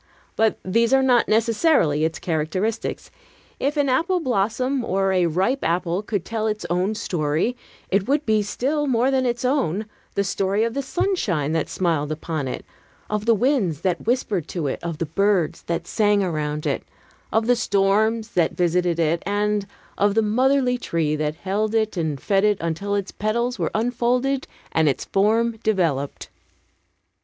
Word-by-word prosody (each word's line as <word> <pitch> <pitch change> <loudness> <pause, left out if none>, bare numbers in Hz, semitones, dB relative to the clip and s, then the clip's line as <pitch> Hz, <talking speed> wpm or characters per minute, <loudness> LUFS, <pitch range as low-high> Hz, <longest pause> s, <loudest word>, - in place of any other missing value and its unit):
But 220 -1 +2
these 230 +6 +2
are 265 0 +5
not 250 -3 +4
necessarily 220 - +2
its 160 0 0
characteristics. 185 +7 -2 0.5
If 290 +3 -1
an 290 -1 +2
apple 335 +8 +2
blossom 255 - 0
or 195 -2 +1
a 180 -2 +3
ripe 190 - 0
apple 175 +2 0
could 205 -4 -3
tell 220 -1 -2
its 210 -4 -2
own 185 +5 +1
story, 165 +4 -1 0.4
it 195 +2 +1
would 285 +2 +1
be, 215 -1 +3
still 285 +8 -1
more 255 +1 +2
than 260 -1 +2
its 240 +1 -2
own, 220 - 0 0.3
the 200 - +2
story 195 +1 0
of 230 0 -1
the 280 - -1
sunshine 250 - -1
that 160 -1 -1
smiled 160 -5 0
upon 155 -2 -3
it, 125 - -5 0.5
of 210 +1 -2
the 230 - +5
winds 210 - +1
that 180 +1 -1
whispered 225 - 0
to 170 -4 -3
it, 135 - -2
of 170 -2 -4
the 165 - -2
birds 195 0 +1
that 170 - -2
sang 205 -2 +2
around 150 -4 -2
it, - - 0 0.5
of 220 0 +2
the 245 +1 +4
storms 215 +1 +1
that 175 -7 0
visited 175 -1 +1
it, 165 0 +1
and 205 0 0 0.3
of 205 0 +3
the 225 - +3
motherly 250 +3 +2
tree 160 -8 -1
that 150 0 -2
held 205 +5 -1
it 220 -1 +1
and 160 -5 -2
fed 195 +7 +1
it 210 -1 +3
until 170 +5 -2
its 200 -1 -2
petals 235 +4 -1
were - - 0
unfolded 245 +4 0 0.2
and 160 -2 +3
its 135 - -2
form 225 +3 +2
developed. 165 -10 -1
205 Hz, 170 wpm, -23 LUFS, 170-235 Hz, 0.5 s, are